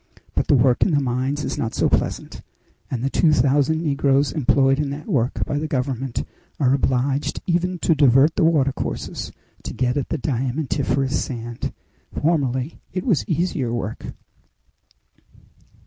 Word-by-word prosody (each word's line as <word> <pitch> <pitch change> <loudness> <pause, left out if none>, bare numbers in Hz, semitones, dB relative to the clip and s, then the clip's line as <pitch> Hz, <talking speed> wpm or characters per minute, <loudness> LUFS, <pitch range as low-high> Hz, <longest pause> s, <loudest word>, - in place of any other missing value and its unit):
But - - -1
the - - +5
work 125 -1 +3
in - - +4
the 145 - +4
mines 135 +2 -1
is - - -3
not 115 - -2
so - - +2
pleasant, - - -2 0.5
and 125 -2 -3
the 135 - +1
two 160 - +3
thousand 145 +4 +2
negroes 140 -2 +2
employed 135 -1 +2
in 150 -2 -1
that 145 +2 -6
work 125 -2 0
by 145 - -2
the 155 - -3
government 130 -3 -2 0.4
are 135 -3 +3
obliged 135 +1 0
even 180 +1 0
to 165 - +5
divert 145 +1 +4
the 190 - +2
watercourses 145 -5 0 0.3
to - - -7
get 125 +2 0
at 140 - -2
the 160 - -1
diamantiferous 135 0 -1
sand. 120 -2 -5 0.5
Formerly 140 -3 0
it 185 0 -4
was 195 - +1
easier 165 -7 0
work." 115 -2 -4
140 Hz, 150 wpm, -22 LUFS, 125-150 Hz, 0.5 s, the